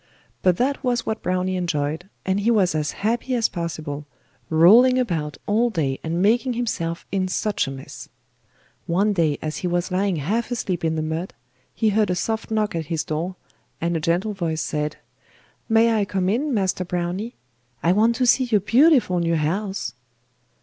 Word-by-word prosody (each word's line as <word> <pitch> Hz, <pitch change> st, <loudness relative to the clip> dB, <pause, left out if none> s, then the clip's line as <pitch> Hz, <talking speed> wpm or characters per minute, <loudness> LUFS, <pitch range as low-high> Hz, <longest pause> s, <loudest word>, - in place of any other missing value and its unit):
But 180 Hz, -2 st, +3 dB
that 275 Hz, +3 st, 0 dB
was 245 Hz, -2 st, 0 dB
what 220 Hz, -, -2 dB
Browny 185 Hz, +1 st, -1 dB
enjoyed, 165 Hz, 0 st, -2 dB, 0.2 s
and 190 Hz, +1 st, +1 dB
he 210 Hz, +3 st, +1 dB
was 200 Hz, -6 st, +3 dB
as 150 Hz, -1 st, -1 dB, 0.2 s
happy 240 Hz, +3 st, 0 dB
as 230 Hz, -2 st, +2 dB
possible, 155 Hz, -4 st, -5 dB, 0.4 s
rolling 220 Hz, +11 st, +6 dB
about 160 Hz, -, -1 dB
all 225 Hz, +4 st, +2 dB
day 145 Hz, -, -1 dB
and 170 Hz, +3 st, -1 dB
making 240 Hz, +5 st, +2 dB
himself 170 Hz, -8 st, -3 dB
in 190 Hz, -1 st, 0 dB
such 195 Hz, -3 st, -1 dB
a -, -, -4 dB
mess. 135 Hz, 0 st, -9 dB, 0.8 s
One 200 Hz, +5 st, +2 dB
day, 160 Hz, -6 st, +1 dB
as 155 Hz, -1 st, -3 dB
he 180 Hz, -, -2 dB
was 175 Hz, +1 st, -1 dB
lying 190 Hz, 0 st, +1 dB
half 205 Hz, +11 st, -1 dB
asleep 195 Hz, -9 st, -2 dB
in 160 Hz, 0 st, +1 dB
the 155 Hz, -, -1 dB
mud, 160 Hz, +4 st, -4 dB, 0.4 s
he 220 Hz, -, +2 dB
heard 210 Hz, 0 st, +2 dB
a 180 Hz, -, +1 dB
soft 220 Hz, +4 st, -2 dB
knock 215 Hz, -1 st, 0 dB
at 165 Hz, -1 st, -3 dB
his 160 Hz, -2 st, -1 dB
door, 160 Hz, +4 st, -3 dB, 0.4 s
and 170 Hz, +1 st, -1 dB
a -, -, +1 dB
gentle 175 Hz, +6 st, 0 dB
voice 165 Hz, -5 st, -2 dB
said: 150 Hz, -1 st, -2 dB, 0.7 s
'May 225 Hz, +1 st, +4 dB
I 210 Hz, -2 st, +1 dB
come 190 Hz, -2 st, -1 dB
in, 270 Hz, +8 st, 0 dB
Master 190 Hz, -5 st, 0 dB
Browny? 180 Hz, +6 st, -3 dB, 0.5 s
I 170 Hz, -, +4 dB
want 220 Hz, +5 st, +3 dB
to 250 Hz, -, +1 dB
see 255 Hz, +2 st, +4 dB
your 220 Hz, -5 st, +2 dB
beautiful 240 Hz, -, +4 dB
new 170 Hz, -1 st, +1 dB
house. 190 Hz, -, -2 dB
185 Hz, 180 wpm, -23 LUFS, 165-220 Hz, 0.8 s, rolling